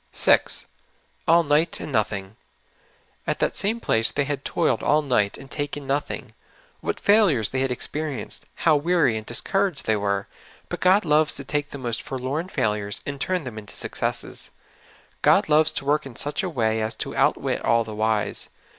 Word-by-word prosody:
6. -, -, +3 dB, 0.2 s
* -, -, -39 dB
' -, -, -38 dB
All 170 Hz, +1 st, +6 dB
night, 155 Hz, +2 st, +2 dB
and -, -, -6 dB
nothing. 105 Hz, -3 st, -1 dB, 0.3 s
' -, -, -36 dB
' -, -, -37 dB
At -, -, 0 dB
that -, -, 0 dB
same 220 Hz, +4 st, +1 dB
place 115 Hz, -, +2 dB
they 145 Hz, -, 0 dB
had 140 Hz, 0 st, -3 dB
toiled 170 Hz, -, 0 dB
all 150 Hz, +1 st, +3 dB
night 105 Hz, -8 st, +1 dB
and 135 Hz, -, -11 dB
taken 145 Hz, -1 st, -4 dB
nothing. 140 Hz, +2 st, -3 dB, 0.5 s
What -, -, -3 dB
failures 195 Hz, -, +4 dB
they 130 Hz, -, -2 dB
had 135 Hz, 0 st, +1 dB
experienced! 145 Hz, +3 st, -3 dB
How^ 155 Hz, -3 st, +4 dB
weary 165 Hz, -7 st, +2 dB
and 110 Hz, 0 st, -5 dB
discouraged 190 Hz, +7 st, +1 dB
the}^ 110 Hz, -1 st, +1 dB
were! 100 Hz, -1 st, -1 dB, 0.4 s
But -, -, -4 dB
God 185 Hz, +2 st, +4 dB
loves 150 Hz, 0 st, +3 dB
to 140 Hz, -, -6 dB
take 145 Hz, +1 st, -2 dB
the -, -, -7 dB
most 120 Hz, -4 st, -3 dB
forlorn 135 Hz, +7 st, -4 dB
failures 105 Hz, -, -1 dB
and 140 Hz, -1 st, -5 dB
turn 185 Hz, -3 st, 0 dB
them 120 Hz, -5 st, -6 dB
into 105 Hz, -, -12 dB
successes. -, -, -3 dB, 0.7 s
God -, -, +4 dB
loves 155 Hz, +1 st, +4 dB
to 140 Hz, -, -3 dB
work 145 Hz, 0 st, +1 dB
in 125 Hz, -, -11 dB
such 145 Hz, +4 st, +1 dB
a 185 Hz, -, -2 dB
wa}' 130 Hz, -9 st, -2 dB, 0.2 s
as 110 Hz, +1 st, -2 dB
to -, -, -5 dB
outwit -, -, +1 dB
all 115 Hz, 0 st, +3 dB
the 110 Hz, -1 st, -8 dB
wise. 110 Hz, 0 st, -1 dB
140 Hz, 190 wpm, -24 LUFS, 110-155 Hz, 0.7 s, All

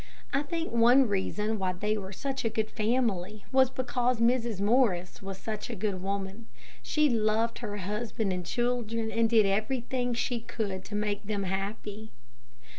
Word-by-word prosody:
I 275 Hz, -, +3 dB
think 330 Hz, +3 st, -3 dB
one 240 Hz, +3 st, +6 dB
reason 210 Hz, +2 st, -1 dB
why 185 Hz, -1 st, 0 dB
they 210 Hz, +4 st, 0 dB
were 195 Hz, -2 st, -5 dB
such 270 Hz, +6 st, -3 dB
a 225 Hz, -, +2 dB
good 220 Hz, 0 st, -1 dB
family 215 Hz, -4 st, 0 dB
was 260 Hz, -1 st, +5 dB
because 250 Hz, -1 st, 0 dB
Mrs. 235 Hz, -3 st, +2 dB
Morris 200 Hz, -5 st, +2 dB
was 195 Hz, -1 st, -6 dB
such 215 Hz, 0 st, -5 dB
a -, -, -4 dB
good 195 Hz, -2 st, -2 dB
woman. 195 Hz, +3 st, -3 dB, 0.3 s
She 305 Hz, -1 st, +2 dB
loved 225 Hz, -1 st, +1 dB
her 205 Hz, -4 st, -4 dB
husband 210 Hz, +1 st, -2 dB
and 180 Hz, -1 st, -3 dB
children, 230 Hz, +1 st, -1 dB
and 230 Hz, 0 st, +2 dB
did 220 Hz, -2 st, +5 dB
everything 240 Hz, +4 st, 0 dB
she 245 Hz, 0 st, -1 dB
could 200 Hz, -4 st, -4 dB
to 205 Hz, -, -6 dB
make 205 Hz, -1 st, -1 dB
them 205 Hz, -2 st, -1 dB
happy. 205 Hz, +3 st, -4 dB
220 Hz, 165 wpm, -29 LUFS, 200-240 Hz, 0.3 s, one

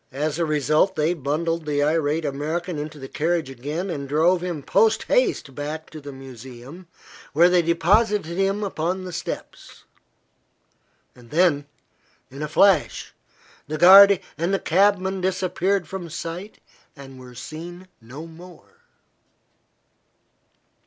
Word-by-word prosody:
As 150 Hz, +4 st, -2 dB
a 170 Hz, -, +1 dB
result 155 Hz, +5 st, +1 dB
they 155 Hz, +2 st, +1 dB
bundled 165 Hz, +2 st, -2 dB
the 145 Hz, -1 st, +1 dB
irate 155 Hz, +1 st, 0 dB
American 155 Hz, +4 st, -3 dB
into 150 Hz, +1 st, -6 dB
the 135 Hz, -2 st, -8 dB
carriage 160 Hz, -1 st, -1 dB
again 150 Hz, +9 st, -4 dB
and 140 Hz, -4 st, -5 dB
drove 170 Hz, +5 st, +3 dB
him 175 Hz, -5 st, -4 dB
poste 220 Hz, +7 st, +2 dB
haste 425 Hz, -, 0 dB
back 150 Hz, +3 st, -6 dB
to 155 Hz, -, -9 dB
the 145 Hz, 0 st, -8 dB
museum, 130 Hz, +5 st, -11 dB, 0.5 s
where 170 Hz, +4 st, +5 dB
they 180 Hz, -1 st, +4 dB
deposited 170 Hz, +2 st, +1 dB
him 195 Hz, +2 st, 0 dB
upon 185 Hz, -1 st, -2 dB
the 180 Hz, -1 st, -7 dB
steps. 175 Hz, -, -7 dB, 1.3 s
Then 145 Hz, +4 st, 0 dB, 0.6 s
in 140 Hz, +2 st, -9 dB
a 150 Hz, -, -2 dB
flash 190 Hz, +6 st, +2 dB, 0.5 s
the 155 Hz, +2 st, -4 dB
guarde 195 Hz, +3 st, +8 dB, 0.2 s
and 170 Hz, +3 st, 0 dB
the 195 Hz, -, +2 dB
cabman 190 Hz, +1 st, +2 dB
disappeared 185 Hz, 0 st, -1 dB
from 185 Hz, -3 st, -7 dB
sight 170 Hz, +5 st, -7 dB, 0.4 s
and 135 Hz, -2 st, -12 dB
were 125 Hz, -1 st, -13 dB
seen 175 Hz, +7 st, -9 dB
no 130 Hz, +8 st, -10 dB
more. 175 Hz, -, -15 dB
165 Hz, 130 wpm, -23 LUFS, 145-185 Hz, 1.3 s, guarde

